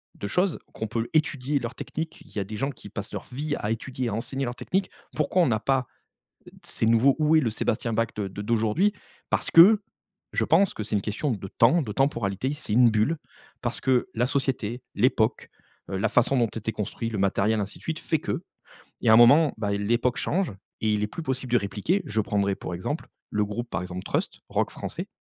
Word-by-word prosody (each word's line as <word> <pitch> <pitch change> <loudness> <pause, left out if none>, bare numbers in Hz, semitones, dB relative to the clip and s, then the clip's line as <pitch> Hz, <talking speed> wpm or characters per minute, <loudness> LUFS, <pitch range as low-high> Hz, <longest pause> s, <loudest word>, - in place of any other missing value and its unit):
de 100 - -5
choses, 180 - +1
qu'on 110 - -4
peut 115 +1 -2
étudier 145 -3 +1
leur 120 +1 -5
technique, 160 +2 -5
il 155 - -17
y - - 0
a 100 - 0
des 105 +2 -6
gens 135 +6 -1
qui 115 -5 -12
passent 105 +2 -6
leur 100 - -5
vie 145 +3 -2
à 105 - -2
étudier 125 +2 -3
à 110 - -2
enseigner 130 +5 -2
leur 120 0 -4
technique. 190 +7 -1 0.2
Pourquoi 155 +4 +2
on 170 - +4
n'a 110 -3 +1
pas, 130 0 +1 0.8
ces - - -2
nouveaux 115 +4 +4
où 155 +1 +4
est - - +6
le 125 - 0
Sébastien 110 +1 -1
Bach 115 +1 +1
de 100 -2 -2
de 100 +2 -7
d'aujourd'hui? 115 - +2 0.4
Parce - - 0
que, 200 +6 +8 0.5
je - - +2
pense 200 -1 +3
que 105 - -4
c'est 105 - -4
une 105 - +3
question 110 +8 -2
de 95 -3 -5
temps, 130 - +4
de 120 - -4
temporalité 120 -2 0
c'est 145 -8 -4
une 120 -1 +6
bulle, 110 +10 +2 0.5
parce - - -2
que 130 +6 +2
la 120 - +2
société, 125 -3 -1
l'époque, 110 0 +1 0.4
heu, 95 - -2
la 105 +4 +1
façon 125 +2 +3
dont 120 -3 +3
était 110 0 -4
construit 110 +2 -3
le 110 - -4
matériel 100 +3 +2
ainsi 100 +1 -5
de - - -20
suite 160 -1 -3
fait 160 - 0
que, - - -3 0.6
il - - -4
y - - +5
a - - +8
un - - +9
moment, 140 +6 +7
ben 105 -2 -2
l'époque 115 +5 +1
change 185 - 0 0.3
et 110 -1 +2
il 105 - 0
est 105 - +2
plus 165 - -7
possible 130 -3 -3
de 120 - +6
répliquer, 105 - -1
je 110 +1 0
prendrai 100 -1 0
pour 90 - -5
exemple 90 - -4 0.2
le 105 0 +1
groupe, 120 +4 -5
par 85 - -2
exemple 90 0 -5
Trust, - - -2
rock - - 0
français, - - -6
115 Hz, 225 wpm, -26 LUFS, 105-140 Hz, 0.8 s, un